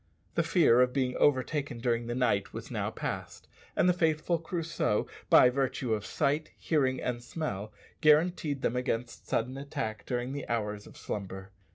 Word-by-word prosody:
The - - +2
fear 160 -7 +5
of 125 0 +3
being 130 -2 0
overtaken 140 -1 +1
during 115 -1 0
the 120 - -2
night 100 -6 +1
was - - -7
now - - -1
past, - - -5 0.3
and - - +3
the 180 - +5
faithful 165 0 +1
Crusoe, 165 - -1 0.2
by 125 - +8
virtue 130 -2 0
of 105 -1 -2
sight, 150 +1 0
hearing, 130 -5 +1
and 120 -1 -2
smell, 110 - -4 0.3
guaranteed 155 -2 +3
them 120 - +1
against 125 -1 -3
sudden 125 +4 -1
attack 110 -7 -4
during 125 +1 -2
the 145 -1 -5
hours 105 -3 -2
of - - -14
slumber. 95 -1 -6
130 Hz, 165 wpm, -30 LUFS, 115-150 Hz, 0.3 s, by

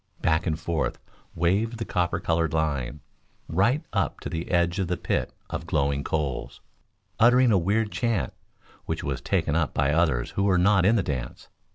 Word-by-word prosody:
Back 80 -2 +1
and 80 -1 -1
forth 85 -2 -1 0.4
waved 100 +8 +1
the 115 - -4
copper 90 -1 0
colored 80 -2 0
line, 75 -3 -1 0.5
right 115 - +1
up - - 0
to - - -5
the 80 +1 -4
edge 85 +1 +1
of 95 - 0
the 90 0 -1
pit - - -1 0.2
of 80 +2 -4
glowing 70 -3 0
coals, 75 -5 -3 0.6
uttering 125 +1 +6
a 100 - +5
weird 105 +5 0
chant, 115 -5 -1 0.5
which - - -3
was 70 -1 -3
taken 80 -2 0
up 80 -2 0
by 70 +1 +2
others 80 -7 +1
who 100 - 0
were 95 -2 +3
not 95 +1 +4
in 110 - +5
the 100 - +2
dance. 65 -6 -5
85 Hz, 180 wpm, -26 LUFS, 75-100 Hz, 0.6 s, uttering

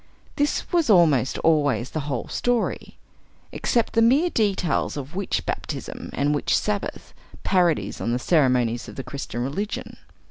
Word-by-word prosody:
This 290 0 0
was 340 -7 +2
almost 155 - +4
always 145 -5 +2
the 155 - -2
whole 125 -4 -3
story, 245 -1 -1 0.5
except 235 -2 0
the 230 - +3
mere 280 +10 +4
details 195 -9 0
of 140 0 -6
the 180 - -8
witch 200 - -2
baptism - - -5
and 145 +2 +1
witch 145 - +1
sabbath, 210 -1 -3 0.3
parodies 170 - +1
on 115 - -1
the 120 - +1
ceremonies 125 -5 +2
of - - -10
the 135 - -5
Christian 130 -4 -5
religion. 195 +11 -4
160 Hz, 150 wpm, -24 LUFS, 130-210 Hz, 0.5 s, almost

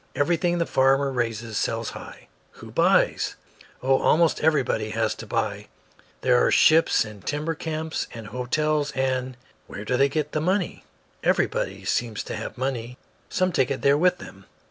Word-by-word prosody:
Everything 175 +3 +1
the 170 - +1
farmer 135 0 +2
raises 115 -3 -2
sells 115 -1 -2
high." - - -11 0.3
"Who - - -12
buys?" - - +2 0.5
"Oh, 135 +1 +3
almost 165 0 +3
everybody 145 -8 +1
has 110 0 0
to 115 - -10
buy. 105 -2 -2 0.5
There 125 -1 +4
are - - +3
ships 160 -5 +4
and 105 -2 -11
timber 150 +3 -2
camps 160 0 -4
and 115 -2 -9
the 105 - -10
hotels, 145 +5 0
and 130 -1 -1
" - - -36
"Where 105 - -8
do 125 - 0
they 140 +1 +4
get 150 0 -2
the 155 - -1
money?" 185 +2 -1 0.4
"Everybody 95 0 0
seems 115 +1 -1
to - - -6
have - - -6
money. 125 -2 -3 0.3
Some 185 0 +1
take 130 -5 +1
it 140 - -3
there 140 0 +5
with 180 +4 +3
them. 95 - -13
130 Hz, 170 wpm, -24 LUFS, 115-155 Hz, 0.5 s, there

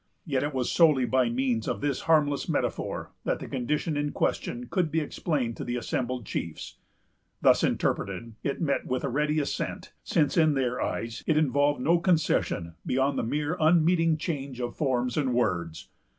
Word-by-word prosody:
Yet 135 -6 0
it 145 - -1
was 130 -3 -1
solely 150 -7 +5
by 125 0 +2
means 120 -2 0
of - - -1
this 140 -2 -1
harmless 145 -3 +3
metaphor - - -2
that - - 0
the - - -8
condition 150 +5 -1
in 145 0 -1
question 120 +1 -1
could 175 +4 0
be 160 - +1
explained 145 -5 -2
to - - -4
the 120 - -3
assembled 125 0 -2
chiefs. 85 -5 -5 0.6
Thus - - +5
interpreted, 100 +4 -1
it 140 - -2
met 145 -5 0
with 130 0 -1
a 140 - 0
ready 150 +4 +1
assent; 145 - -3
since, 150 -1 +1
in 155 -3 +4
their 125 -2 0
eyes, 115 -1 -3
it 155 - +3
involved 145 -2 +2
no 170 +5 +3
concession 160 - +1
beyond 135 +2 +1
a - - -1
mere 150 +7 -1
unmeaning 165 0 +4
change 140 -6 -4
of 120 -1 -3
forms 125 -3 0
and 130 -5 +1
words. 85 -9 -1
140 Hz, 175 wpm, -27 LUFS, 125-155 Hz, 0.6 s, solely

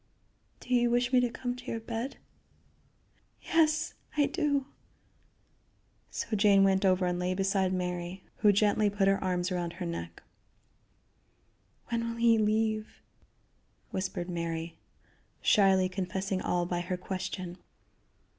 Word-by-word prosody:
"Do 255 - -4
you 240 -1 +4
wish 245 +1 +1
me 255 - +7
to 245 -1 +2
come 245 +1 -4
to 250 0 -12
your 230 - -2
bed?" 230 +4 -5 1.3
"Yes, 315 -1 +2 0.2
I 290 - +5
do." 290 -6 0 1.4
So 225 - -3
Jane 200 -1 +5
went 190 0 +3
over 185 -1 +3
and 180 0 -1
lay 180 +1 0
beside 195 -1 +1
Mary, 180 0 -3
who 210 - +5
gently 205 +1 +3
put 200 -1 +1
her 195 0 +2
arms 180 0 0
about 175 -2 -2
her 180 +1 -5
neck. 85 - -6 1.7
"When 230 -1 -1
will 230 - -5
he 230 -1 +4
leave?" 215 0 0 1.0
whispered 185 -2 -3
Mary, 170 -1 -3 0.6
shyly 190 -2 +4
confessing 190 +1 -3
all 175 -1 0
by 175 0 -2
her 180 +1 -3
question. 185 -1 -5
195 Hz, 130 wpm, -30 LUFS, 180-230 Hz, 1.7 s, me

